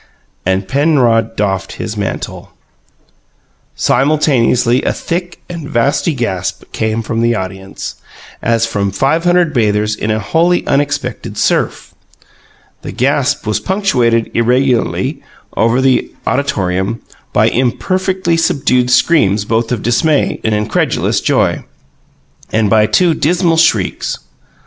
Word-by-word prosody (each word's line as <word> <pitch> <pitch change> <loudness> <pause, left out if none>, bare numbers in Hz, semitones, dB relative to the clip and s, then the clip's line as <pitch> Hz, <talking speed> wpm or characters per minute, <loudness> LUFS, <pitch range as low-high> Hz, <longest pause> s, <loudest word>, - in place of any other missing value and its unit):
And 95 +1 0
Penrod 135 -5 +2
doffed 95 -2 -2
his - - -5
mantle. - - -5 1.2
Simultaneously, 130 -3 +2
a - - 0
thick 175 +1 -4
and 165 -4 -7
vasty 140 +5 +1
gasp 105 -8 -3
came 110 +1 -2
from 115 +1 -2
the 120 0 +2
audience, 95 0 -6 0.4
as 115 0 +1
from 100 -3 -1
five 135 - 0
hundred 175 -2 +3
bathers 105 -2 +1
in 105 - -4
a 110 - +1
wholly 165 - +1
unexpected 140 -4 -2
surf. - - -1 0.9
This - - -7
gasp 140 +2 +1
was 105 0 0
punctuated 125 - +1
irregularly, 125 +1 +1 0.3
over 115 +3 +2
the 130 -1 +1
auditorium, 100 -6 -1 0.3
by - - +3
imperfectly 185 +8 0
subdued 135 -6 +1
screams 125 - +3
both 115 +2 0
of 120 -4 -2
dismay 140 +6 +1
and 110 -1 +1
incredulous 105 0 0
joy, - - +1 0.9
and 110 -2 +1
by 110 -1 +4
two 175 +5 +3
dismal 170 +2 +1
shrieks. 110 - +1
125 Hz, 115 wpm, -14 LUFS, 110-150 Hz, 1.2 s, by